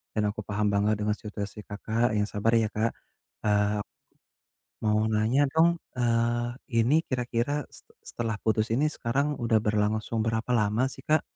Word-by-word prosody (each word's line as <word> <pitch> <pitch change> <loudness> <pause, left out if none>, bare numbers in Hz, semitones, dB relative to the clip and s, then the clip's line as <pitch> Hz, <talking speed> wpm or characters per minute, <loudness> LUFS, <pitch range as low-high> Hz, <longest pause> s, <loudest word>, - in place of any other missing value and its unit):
dan 105 - +1
aku 105 - -5
paham 105 0 0
banget 105 +1 +2
dengan 105 - +2
situasi 105 -1 -6
Kakak, 110 +3 -1
yang 105 - +2
sabar 105 +1 -1
ya 110 -1 +2
Kak, 110 +2 +1 0.6
eee, 105 0 +2 1.0
mau 105 0 +3
nanya 110 +6 +2
dong, 160 +3 +5 0.3
eee, 120 0 +1 0.2
ini 120 +7 +4
kira-kira 125 +3 -1
se - - -13 0.3
setelah 115 -2 -3
putus 110 0 +1
ini 145 +6 +2
sekarang 135 +5 0
udah 115 -1 +3
berlangsung 110 +2 0
berapa 115 +2 -1
lama 110 +2 +2
sih 135 - -12
Kak? 155 +2 +2
110 Hz, 155 wpm, -27 LUFS, 105-120 Hz, 1.0 s, dong